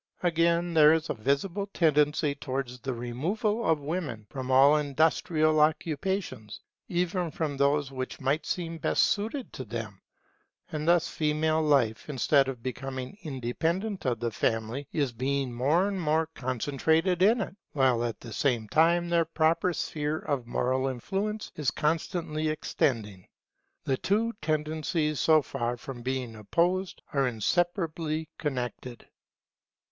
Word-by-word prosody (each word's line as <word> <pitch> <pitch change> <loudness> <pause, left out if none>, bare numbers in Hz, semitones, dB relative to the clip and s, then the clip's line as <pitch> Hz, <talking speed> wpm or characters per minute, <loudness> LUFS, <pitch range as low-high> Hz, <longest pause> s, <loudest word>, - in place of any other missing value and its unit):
Again, 170 0 +2
there 155 -1 +7
is 160 0 0
a - - 0
visible 170 - -1
tendency 150 -4 +2
towards 130 -3 -4
the 135 +1 -3
removal 175 - -1
of 160 -2 +2
women 145 -8 -4
from 130 -2 -5
all 135 +3 +6
industrial 155 +2 +2
occupations, 155 - -1 0.3
even 180 0 -1
from 155 -2 -3
those 140 0 +1
which 130 -1 -5
might 140 +4 0
seem 165 -2 -3
best - - +2
suited 225 +6 -1
to 130 - -5
them. 110 -3 -6 0.7
And 155 +1 -3
thus 170 -1 +4
female 155 +1 +1
life, 140 -6 +2
instead 140 0 +3
of 125 -4 -5
becoming 130 - -5
independent 165 - -2
of 120 -3 0
the 120 -1 -2
Family, 115 +5 -1
is 140 -5 0
being 135 +1 -1
more 150 +10 +2
and 195 -2 -2
more 160 0 +2
concentrated 160 - 0
in 220 +5 +5
it; 195 -3 -4 0.2
while 130 -4 +3
at 115 -2 -3
the 115 -2 -8
same 120 -6 0
time 170 +3 +3
their 170 -1 +2
proper 165 +2 +2
sphere 150 -2 -2
of 140 -6 -3
moral 130 +2 0
influence 195 - -3
is 150 -4 0
constantly 155 +1 -1
extending. 110 -10 -1 0.6
The 130 - 0
two 220 - +1
tendencies 155 0 -1
so 155 -2 +5
far 120 -3 -3
from 120 0 -8
being 130 -2 -3
opposed, 175 - 0
are 135 -2 +2
inseparably 160 - -1
connected. 125 -4 -4
150 Hz, 140 wpm, -28 LUFS, 130-165 Hz, 0.7 s, there